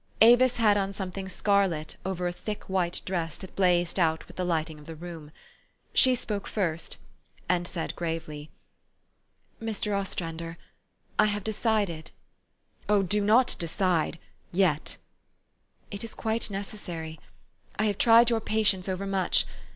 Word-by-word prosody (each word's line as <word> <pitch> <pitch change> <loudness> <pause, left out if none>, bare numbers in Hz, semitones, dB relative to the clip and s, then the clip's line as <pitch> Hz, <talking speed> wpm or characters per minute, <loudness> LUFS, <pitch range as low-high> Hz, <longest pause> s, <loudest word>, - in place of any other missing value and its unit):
Avis 245 +2 +7
had 215 -3 +4
on 195 0 -1
something 190 0 -5
scarlet 185 -5 +1
over 180 -1 -2
a 175 - -2
thick 210 +3 -5
white 180 -2 -1
dress 170 -4 -2
that 190 - -11
blazed 175 -1 +2
out 160 -2 +2
with - - -15
the 185 - -2
lighting 160 -3 -1
of 150 - -15
the 165 - -7
room. 165 -2 -8 0.6
She 255 -1 +5
spoke 210 -4 -3
first, 165 -6 -2 0.5
and 175 -1 +1
she - - -7
said 165 -3 -3
gravely, 160 -3 -4 0.6
" - - -41
Mr. 215 -2 -2
Ostrander, 170 -4 -3 0.6
I - - +7
have 205 -1 -1
decided 205 -7 0 0.3
" - - -47
" - - -31
Oh! 205 -2 +4
do 205 +3 +1
not 235 +5 +5
decide 170 -1 0 0.3
yet/ 175 -5 +1 0.3
' - - -47
" - - -37
It 200 +1 -4
is 230 - -7
quite 220 0 -1
necessary. 180 -6 -6 0.6
I 215 - +1
have 205 -2 0
tried 235 +1 +7
your 225 -1 +1
patience 210 -4 +1
overmuch. 190 0 +1
190 Hz, 155 wpm, -28 LUFS, 170-210 Hz, 0.6 s, Avis